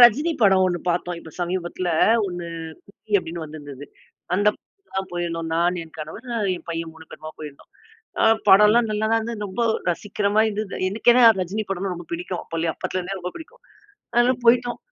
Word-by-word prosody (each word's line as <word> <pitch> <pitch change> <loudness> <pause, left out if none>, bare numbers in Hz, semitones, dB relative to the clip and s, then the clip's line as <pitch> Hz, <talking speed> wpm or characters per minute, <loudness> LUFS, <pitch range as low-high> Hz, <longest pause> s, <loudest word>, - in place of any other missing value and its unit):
ரஜினி 275 +8 +6
படம் 190 -2 +5
1 175 -1 -1
பாத்தோம். 175 0 -2
இப்போ 160 - -12
சமீபத்துல 175 0 -2 0.4
ஒண்ணு, 175 -2 -5 0.4
"குட்டி" 210 +1 -12
அப்டின்னு 165 -1 -6
வந்திருந்தது. 145 -2 -9 0.5
அந்த 205 +3 +2
படத்துக்கு 390 -1 -37
தான் 190 0 -3
போயிருந்தோம். 165 -1 -3
நான் 175 +2 +2
என் 160 - -16
கணவர் 155 +11 -8
அ - - 0 0.2
என் - - -12
பையன் 165 -1 -4
3 160 0 -14
பேருமா 155 0 -9
போயிருந்தோம். 150 -2 -10 0.5
அ - - +5 0.2
படம்லாம் 210 +4 +6
நல்லாதான் 220 +2 +1
இருந்தது, 220 -2 -4
ரொம்ப 195 +6 -2 0.3
ரசிக்குற 200 +3 -3
மாதிரி 220 0 +4
இருந்தது. 205 -2 -5
எனக்கென்ன, 240 +4 +4 0.2
ரஜினி 200 +5 -2
படம்னா 190 0 -2
ரொம்ப 175 -1 -9
பிடிக்கும். 175 +1 -4
அப்போலயே 165 0 -2
அப்போத்துலருந்தே 185 +1 -4
ரொம்ப 180 +1 -4
பிடிக்கும். 320 - -12 0.5
அதனால 240 +2 +4
போயிட்டோம். 240 0 +4
185 Hz, 170 wpm, -23 LUFS, 170-220 Hz, 0.5 s, ரஜினி